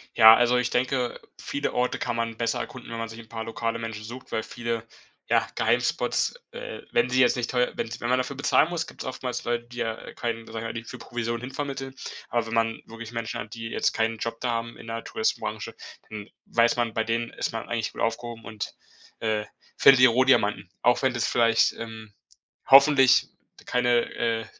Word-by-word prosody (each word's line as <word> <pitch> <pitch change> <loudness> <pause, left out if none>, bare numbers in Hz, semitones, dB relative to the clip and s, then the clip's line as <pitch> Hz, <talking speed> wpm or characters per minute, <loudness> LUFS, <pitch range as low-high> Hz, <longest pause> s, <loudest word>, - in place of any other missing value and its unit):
Ja, 110 0 +10
also 120 +1 +3
ich 125 - +1
denke, 125 0 0 0.2
viele 140 - -3
Orte 125 0 0
kann 120 - -2
man 115 -1 -2
besser 115 -1 0
erkunden, 130 -2 -7
wenn 115 - -4
man 115 -1 -4
sich 115 +1 -9
'n 115 - -13
paar 115 -1 -5
lokale 115 0 -2
Menschen 115 -1 -5
sucht, 120 +4 -9
weil 110 - 0
viele, 115 -1 -4 0.4
ja, - - +3
Geheimspots, - - +1 0.2
äh, - - -7
wenn 240 - +2
sie 130 +1 +2
jetzt 125 -1 +5
nicht 120 -1 -2
teue 125 -1 +2
wenn's 115 - -3
wenn 120 - -3
man 125 - +4
dafür 130 +2 -2
bezahlen 145 +3 +3
muss, 170 -2 -2
gibt's - - -9
oftmals 130 -1 -4
Leute, 120 0 -1
die, 120 0 -12
ja, 115 -1 -4
keinen, 115 -1 -3
sag 115 - -10
ich - - -5
mal 115 - -4
die 115 0 -5
für - - -8
Provision 120 -1 -3
hin 125 +2 -6
vermitteln, 135 -1 -4 0.4
aber 120 -2 0
wenn 110 - -5
man 115 0 +1
wirklich 115 0 -9
Menschen 115 -1 -4
hat, 105 +1 -7
die 115 0 -6
jetzt - - +1
keinen 115 0 0
Job 115 +1 -4
da 125 - -1
haben 115 0 -3
in 115 - -12
der 115 0 -4
Touristenbranche, 110 0 -2 0.3
dann 105 -1 -7 0.2
weiß 115 0 +3
man, 115 -2 0
bei 110 - +1
denen 115 +1 -1
ist - - -2
man 115 -1 -5
eigentlich 115 -2 -2
gut - - -8
aufgehoben 115 0 -2
und, 110 -2 -5 0.5
äh, 110 -1 0 0.3
findet 135 -2 +8
die 130 - +9
Rohdiamanten. 115 -6 +3
Auch 125 - +3
wenn 130 -2 +2
das 120 - 0
vielleicht, 115 -1 +3
ähm, 110 -2 -8 0.5
hoffentlich 135 -1 +7 0.4
keine, 120 -1 +2
äh, 115 -1 0
115 Hz, 210 wpm, -26 LUFS, 115-125 Hz, 0.5 s, Ja